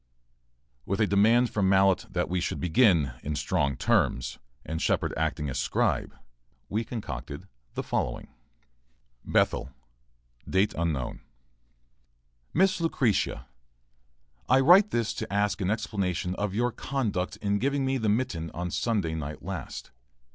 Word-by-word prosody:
With 100 +9 -2
a 110 - +4
demand 110 +5 +4
from 100 -3 +1
Mallett 95 -1 +3
that 90 -1 -1
we 90 0 -1
should - - -2
begin 85 - +3
in 75 +1 -3
strong 70 -2 0
terms, 60 +1 +1 0.3
and 80 0 -4
Shepard - - +1
acting 80 -1 -1
as 65 -2 -3
scribe, - - 0 0.5
we 110 +3 0
concocted 70 - -6 0.3
the - - -2
following: - - -2 1.0
BETHEL,, 65 - +2 0.8
18. 85 - 0 1.3
MISS 190 +1 +2
LUCRETIA, 120 - 0 1.0
I 130 - +6
write 180 +9 +7
this 115 - 0
to 110 - -5
ask 105 0 0
an 95 - 0
explanation 95 -5 -1
of 100 0 -3
your 120 +2 +1
conduct 110 -9 -2
in 100 0 0
giving 140 +2 0
me 135 0 0
the 110 -2 0
mitten 105 -8 -1
on 90 0 -3
Sunday 100 -8 0
night 75 -1 -5
last. 90 -7 -6
100 Hz, 130 wpm, -27 LUFS, 80-115 Hz, 1.3 s, write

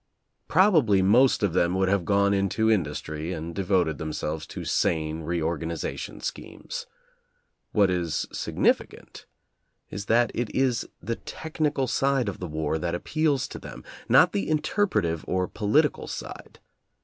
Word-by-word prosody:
Prob 190 +4 +4
ably 105 -9 +4
most 120 +5 +4
of 100 -5 +1
them 90 0 +2
would 95 0 +2
have 95 -2 +1
gone 100 +1 +3
into 100 +3 +1
industry 80 -3 -2
and 80 +1 -5
devoted 90 -5 +1
themselves 75 0 -4
to - - -7
sane 80 0 0
reorganization 80 0 -3
schemes. - - -6 0.8
What 100 -3 +3
is 85 -3 -1
significant - - -1 0.6
is 100 +1 -6
that 120 0 +3
it 120 -2 -2
is 130 -3 +1
the 115 - -2
tech 160 0 -9
nical 145 -4 +1
side 135 -1 +1
of 100 - -7
the 90 - -4
war 80 0 -2
that 85 +1 -2
appeals 150 - 0
to - - -7
them, 60 +1 -10 0.3
not - - +6
the 100 +6 -1
interpretative 155 - 0
or 95 0 0
political 135 - +1
side. - - -8
95 Hz, 145 wpm, -26 LUFS, 80-120 Hz, 0.8 s, not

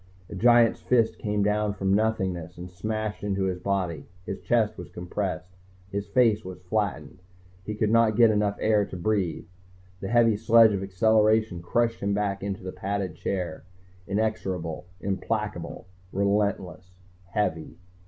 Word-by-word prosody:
A - - -5
giant's 120 +2 +4
fist 115 -3 +2
came 105 -1 0
from 105 - +3
out 105 -1 -1
of 95 - -1
nothingness 95 -5 0
and 90 +1 -8
smashed 110 +3 -4
into 100 -1 -1
his 95 -1 -1
body. 90 -5 -2 0.2
His 95 - -5
chest 110 -3 +1
was 90 -3 -9
compressed, 90 +1 -4 0.4
his 100 +1 -3
face 110 -1 +3
was 90 0 -9
flattened, 90 -5 -2 0.4
he 105 +2 -4
could 105 0 +1
not 115 -2 +4
get 115 0 +6
enough 105 -1 +1
air 105 -1 +3
to 95 - -7
breathe. 90 -4 -1 0.5
The 95 - -5
heavy 115 -1 +4
sledge 115 0 +6
of 95 - -2
acceleration 110 0 +2
crushed 115 +6 0
him 100 0 0
back 100 -1 -1
into 100 -1 -4
the 95 - -5
padded 100 -1 -3
chair, 90 -4 -4 0.4
inexorable, 95 -6 -2
implacable, 100 -3 -3 0.3
relentless, 100 -2 -1 0.3
heavy. 90 -4 -2
100 Hz, 150 wpm, -26 LUFS, 90-110 Hz, 0.5 s, get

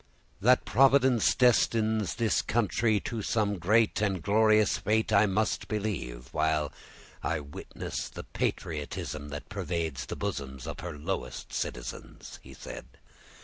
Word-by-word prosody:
"That 125 +4 +4
Providence 130 -3 +4
destines 110 -5 +3
this 115 -1 +1
country 110 -1 +1
to 115 -2 -4
some 105 -2 0
great 105 +4 +3
and 95 -3 +1
glorious 110 +4 +3
fate 110 +2 +1
I 105 +1 +6
must 105 +3 0
believe, 100 - -3
while 75 -1 0 0.5
I 85 - -1
witness 70 -1 -6
the - - -8
patriotism 75 -1 -3
that 75 0 -7
pervades 80 -7 -3
the - - -4
bosoms 65 -2 -4
of - - -6
her 85 -2 -6
lowest 70 -6 -4
citizens," - - -6
he - - -13
said. - - -9
100 Hz, 130 wpm, -29 LUFS, 75-110 Hz, 0.5 s, I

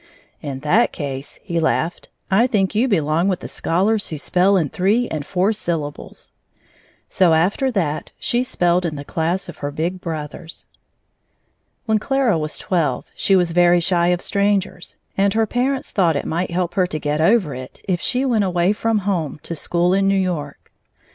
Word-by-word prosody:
"In 135 -2 -5
that 180 +11 +3
case," 140 -2 -6
he 170 -4 -2
laughed, 160 +1 -1 0.2
"I 225 +6 +4
think 200 -5 +1
you 225 +5 +2
belong 165 - +1
with 185 -3 0
the - - -6
scholars 200 +6 0
who 155 - -5
spell 185 +6 +2
in 160 -6 0
three 210 - +1
and 155 -2 -3
four 190 +7 +1
syllables." 165 -8 -5 0.8
So 180 -3 +3
after 195 +11 +1
that, 170 - -2
she 240 +1 0
spelled 175 -7 +1
in 165 -3 -2
the 145 0 -7
class 170 +5 -1
of - - -9
her 145 - -3
big 170 +5 -3
brothers. 160 -1 -7 1.2
When 220 -2 +2
Clara 260 -7 +1
was 155 0 -3
twelve, 155 -9 -1
she 195 - +2
was 175 -2 +2
very 175 +1 +4
shy 175 0 +2
of 175 0 +1
strangers, 200 -1 -1 0.2
and 200 +1 +2
her 225 0 +3
parents 255 +4 -1
thought 175 -6 +2
it 140 - -2
might 170 +3 -1
help 175 0 -1
her 185 -2 +2
to 155 - -4
get 150 +1 -1
over 185 -4 +3
it 130 0 -9
if 180 -2 0
she 255 +1 0
went 230 -5 +2
away 180 +1 +2
from 225 +1 0
home 170 -8 -1
to - - -5
school 175 +3 0
in 195 0 +2
New 195 0 +3
York. 160 -7 -4
180 Hz, 180 wpm, -20 LUFS, 160-200 Hz, 1.2 s, I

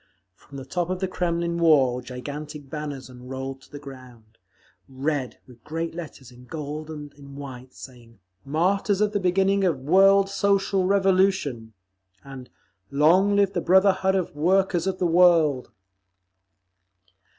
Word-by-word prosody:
From 140 +8 -14
the 135 - -8
top 175 +4 -3
of 185 0 -2
the 190 - -1
Kremlin 170 -1 -2
wall 135 -7 +3
gigantic 145 +3 -8
banners 145 -4 -6
unrolled 130 +1 -8
to - - -20
the 145 - -8
ground; 125 -6 -14 0.5
red, 135 0 -3
with 120 -3 -18
great 165 +1 -4
letters 150 -7 -9
in 125 +1 -16
gold 150 +2 -6
and 150 -2 -8
in 140 -1 -14
white, 130 -2 -10
saying, 120 -4 -13 0.3
"Martyrs 185 +7 0
of 210 0 +1
the 205 - -1
Beginning 195 +2 +1
of 175 -6 +1
World 195 +6 +5
Social 195 -1 +1
Revolution," 190 - +1 0.5
and 135 -2 -11 0.4
"Long 175 +8 +3
Live 200 -1 +2
the 175 - -1
Brotherhood 190 +1 +3
of 185 -5 -2
Workers 180 +2 +1
of 190 -1 -1
the 180 - -1
World." 165 -6 +3
155 Hz, 140 wpm, -24 LUFS, 135-190 Hz, 0.5 s, World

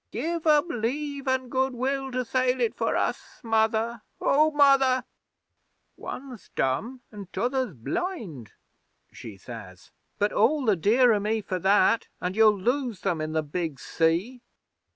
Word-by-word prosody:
"Give 325 +7 -3
'em 300 +1 +4
Leave 280 +2 -3
an' 260 -1 0
Good 260 +1 0
will 270 +2 -2
to 255 0 -2
sail 255 +1 +1
it 235 -2 +1
for - - -1
us, - - -3
Mother 225 0 +1 0.2
O 305 +3 +3
Mother!" 275 -3 +4 0.9
'"One's 255 -5 -9
dumb, 225 - -1
an' 205 -3 -9
t'other's 250 - -1
blind," 160 - -5 0.6
she 110 -5 -10
says. 95 -3 -11 0.3
"But 205 0 0
all 265 +6 +2
the 215 -3 +4
dearer 220 +5 +4
me 215 +2 0
for 185 -2 -4
that; 200 +4 +3
and 180 +1 -3
you'll 215 -2 +5
lose 245 0 -1
them 175 -5 -1
in 155 0 -3
the 160 -1 0
big 155 -2 -4
sea." 170 - 0
230 Hz, 145 wpm, -26 LUFS, 185-265 Hz, 0.9 s, you'll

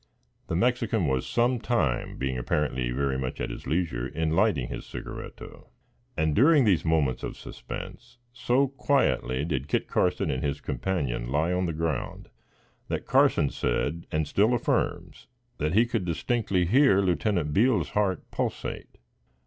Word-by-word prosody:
The - - -2
Mexican 115 -1 +1
was 65 -3 0
some 120 +1 +1
time, 110 - -1
being 65 0 -2
apparently 65 0 -1
very 65 +1 -1
much 65 -1 -4
at - - -3
his - - -8
leisure, 75 -7 -1
in 80 +2 -1
lighting 90 - +2
his - - -6
cigarretto; - - -9 0.5
and, 80 -1 +1
during 145 +1 +5
these 95 -6 +3
moments 80 -5 +1
of - - -5
suspense, - - -9 0.2
so 125 +2 +2
quietly 135 - 0
did 70 -4 -2
Kit - - 0
Carson - - +1
and 65 - -2
his 70 0 -1
companion 65 -4 -2
lie 80 +5 +1
on 90 0 0
the - - -1
ground, 80 -3 -3 0.6
that - - -3
Carson 70 - +3
said, 85 +3 -2
and 80 -1 0
still 105 +10 +3
affirms, 120 - -2 0.3
that 75 +4 0
he 115 +3 +5
could 115 -4 -2
distinctly 90 +2 0
hear 120 - +5
Lieutenant 90 -3 0
Beale's 115 - +3
heart 100 -4 0
pulsate. - - -4
85 Hz, 150 wpm, -27 LUFS, 70-110 Hz, 0.6 s, during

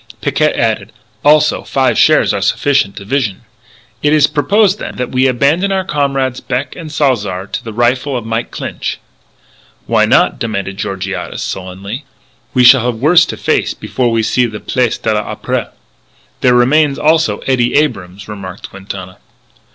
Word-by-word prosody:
Picquet - - +1
added: - - -1 0.3
"Also 150 +1 +4
five 135 -1 +1
shares - - +4
are - - -2
sufficient 140 -8 +1
division." 105 -1 -2 0.6
"It 150 +1 +2
is 150 -2 +5
propose, 190 +8 +2
then, - - -7
that 125 - -4
we 130 +1 +2
abandon 145 +10 +1
our 190 -1 0
comrades 135 -5 -1
Beck 130 +2 -3
and 160 -3 -8
Salzar 105 -11 0
to - - -5
the 115 - -6
rifle 125 +4 0
of 120 - -6
Mike 115 +1 -2
Clinch?" - - -5 0.9
"Why - - +3
not?" - - +3
demanded 100 -4 -3
Georgiades 95 -1 -4
sullenly; 95 +7 -6 0.5
"we 125 - +4
shall 125 0 +7
have 125 -1 -1
worse 165 +8 +4
to - - -5
face - - 0
before 125 -2 -1
we 115 -1 +1
see 125 +2 +2
the 110 -2 -7
Place 125 -3 0
de 110 - -1
l'Opéra." 105 0 -3 0.7
"There 125 -1 +3
remains, 140 +4 +3
also, 160 +1 +2
Eddie 125 -2 +1
Abrams," 100 -10 -1
remarked 100 -2 -8
Quintana. 95 -1 -9
125 Hz, 155 wpm, -14 LUFS, 105-145 Hz, 0.9 s, shall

